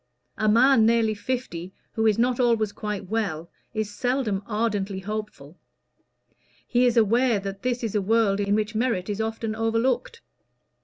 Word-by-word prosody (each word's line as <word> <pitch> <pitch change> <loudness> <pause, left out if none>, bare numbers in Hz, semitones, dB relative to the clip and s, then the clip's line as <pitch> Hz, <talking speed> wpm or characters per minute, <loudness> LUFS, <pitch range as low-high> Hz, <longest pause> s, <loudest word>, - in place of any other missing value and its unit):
A 215 0 +2
man 235 +2 +5
nearly 230 -1 +3
fifty 205 -6 -4 0.2
who 225 0 +1
is 215 - +3
not 245 +1 +1
always 230 -4 +2
quite 210 -2 -5
well 180 -6 -3 0.2
is 215 -1 -2
seldom 245 -4 -1
ardently 210 -3 -1
hopeful: 210 -6 -6 1.1
he 250 0 +3
is 240 0 +1
aware 230 +1 +3
that 195 0 -6
this 250 -1 -2
is 225 - -2
a 210 - +1
world 205 -1 +2
in 200 0 +1
which 215 +1 -1
merit 220 -4 -1
is 205 +2 -2
often 225 0 -3
overlooked. 230 - -1
220 Hz, 155 wpm, -25 LUFS, 205-235 Hz, 1.1 s, man